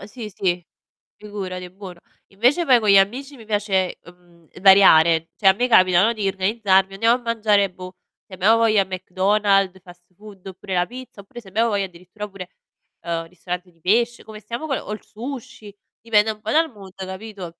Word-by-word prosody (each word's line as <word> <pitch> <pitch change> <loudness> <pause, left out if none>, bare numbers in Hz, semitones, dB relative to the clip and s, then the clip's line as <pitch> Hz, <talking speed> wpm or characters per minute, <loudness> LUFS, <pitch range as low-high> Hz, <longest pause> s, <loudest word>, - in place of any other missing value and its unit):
Uhm 195 - -10
sì, 215 +1 -8
sì 175 -2 -1 0.5
figurati, 185 -4 -7
buono. 185 -2 -11 0.3
Invece 250 - +1
poi 255 -4 +5
con 215 -2 -1
gli 200 - +7
amici 255 +9 0
mi 225 - -14
piace, 205 -3 -1
uhm, 170 -1 -20
variare, 170 -4 +6
cioè 195 - 0
a 190 - +8
me 245 +5 -1
capita 185 -5 +5
no, 230 - +2
di 210 -3 -3
organizzarmi, 195 0 +1
andiamo 230 +5 +2
a - - -19
mangiare, 215 -4 +1
boh, 185 0 -10 0.3
se - - -17
abbiamo 195 +5 +3
voglia 220 -3 +3
McDonald's, 195 +1 0
fast 175 -1 -17
food 200 -1 -14
oppure 190 0 -8
la 175 -1 +1
pizza 250 -4 -11
oppure 200 +5 -12
se 200 - -15
abbiamo 225 +4 +1
voglia 200 -2 -1
addirittura 185 +4 -10
pure, 190 -3 -10 0.5
ehm, 165 -1 -4
ristorante 180 +1 -7
di 165 - -32
pesc 235 +6 +1
come 215 -1 -11
stiamo 235 +7 -6
con 275 -4 -1
o - - -9
il 215 - -9
sushi, 245 -2 -9 0.3
dipende 220 -1 +2
un 215 - -12
po' 215 - -6
dal 320 0 +2
mood, 195 -4 -14
capito? 190 0 -8
200 Hz, 190 wpm, -21 LUFS, 185-220 Hz, 0.5 s, a